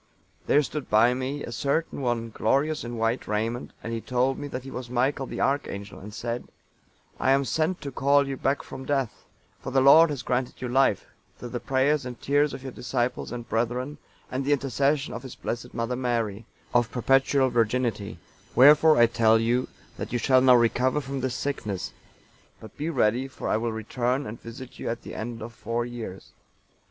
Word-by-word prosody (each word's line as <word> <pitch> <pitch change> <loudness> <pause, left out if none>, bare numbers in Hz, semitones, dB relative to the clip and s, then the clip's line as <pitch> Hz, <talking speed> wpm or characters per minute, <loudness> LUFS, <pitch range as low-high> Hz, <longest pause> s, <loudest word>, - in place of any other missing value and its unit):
There 150 - +4
stood 150 -1 -5
by 110 +3 +5
me 130 +3 -3
a - - -6
certain 140 +6 -1
one, 120 -3 -1
glorious 145 +9 +1
in 120 0 -5
white 115 +2 0
raiment, 115 +4 -2
and 115 - -4
he 115 - -3
told 125 +3 0
me 145 - -5
that 130 -2 -5
he 135 - -9
was 125 -2 -6
Michael, 130 +2 0
the - - -6
Archangel, 105 -8 -2
and 105 +2 -9
said, 120 +2 -4 0.7
'I - - +1
am 135 0 +3
sent 160 +8 0
to 140 - -5
call 140 +2 +3
you 135 - -3
back 135 +2 0
from 135 - -8
death: 135 -4 -2 0.3
for - - -6
the 135 0 +3
Lord 155 +5 +8
has 140 -4 -4
granted 125 0 -1
you 125 - -3
life, 125 -4 +2 0.3
through 120 - -7
the 120 - -4
prayers 135 +3 +1
and 125 -1 -7
tears 145 +1 +2
of 130 - -8
your 135 - -5
disciples 125 0 -2
and 120 -1 -6
brethren, 125 +5 -2 0.3
and 130 +2 -1
the 145 +2 +2
intercession 140 +2 0
of - - -5
His 130 -1 -9
Blessed 120 +1 -5
Mother 115 +1 -2
Mary, 115 -4 -2 0.3
of 120 -1 +3
perpetual 135 +1 +3
virginity; 115 -4 0 0.4
wherefore 150 +4 +7
I 120 - +7
tell 115 -1 +4
you, 120 +3 +1 0.3
that - - -5
you 120 - +1
shall 130 +2 +4
now 130 -1 +7
recover 125 +4 +2
from 135 -1 -4
this 130 -1 -2
sickness; 105 -10 -3 0.7
but 110 - -12
be 155 +3 -3
ready, 125 -3 +1
for 135 - -7
I - - +2
will 115 +1 -1
return 125 +4 -1
and 110 +1 -7
visit 125 +2 -10
you - - -3
at 115 - -4
the - - -8
end 115 0 -5
of 115 +1 -8
four 115 +2 -2
years. 115 -6 -8
125 Hz, 195 wpm, -26 LUFS, 115-135 Hz, 0.7 s, Lord